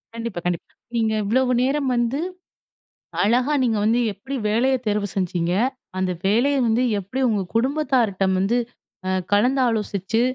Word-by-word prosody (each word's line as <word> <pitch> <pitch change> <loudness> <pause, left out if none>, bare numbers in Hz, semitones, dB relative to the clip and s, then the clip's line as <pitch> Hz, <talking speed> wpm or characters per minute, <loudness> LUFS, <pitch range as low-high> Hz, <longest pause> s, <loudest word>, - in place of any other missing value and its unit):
கண்டிப்பா, 230 -6 -4
கண்டிப் 175 -2 -1 0.3
நீங்க 220 -1 +1
இவ்ளவு 255 +4 +2
நேரம் 275 +1 +1
வந்து 240 +3 0 1.0
அழகா 245 +7 +2
நீங்க 225 -4 +1
வந்து 230 +3 +3
எப்டி 265 +8 -8
வேலைய 250 +5 +2
தேர்வு 210 -1 +1
செஞ்சிங்க. 175 -2 -1 0.5
அந்த 185 -1 0
வேலைய 240 +8 +3
வந்து 230 +3 +2 0.2
எப்டி 200 +8 -4
உங்க 205 -3 +1
குடும்பத்தார்டம் 235 -7 +1
வந்து 200 +6 +1 0.5
அ - - +1 0.2
கலந்தாலோசிச்சு. 225 -3 +1
225 Hz, 130 wpm, -22 LUFS, 200-255 Hz, 1.0 s, வந்து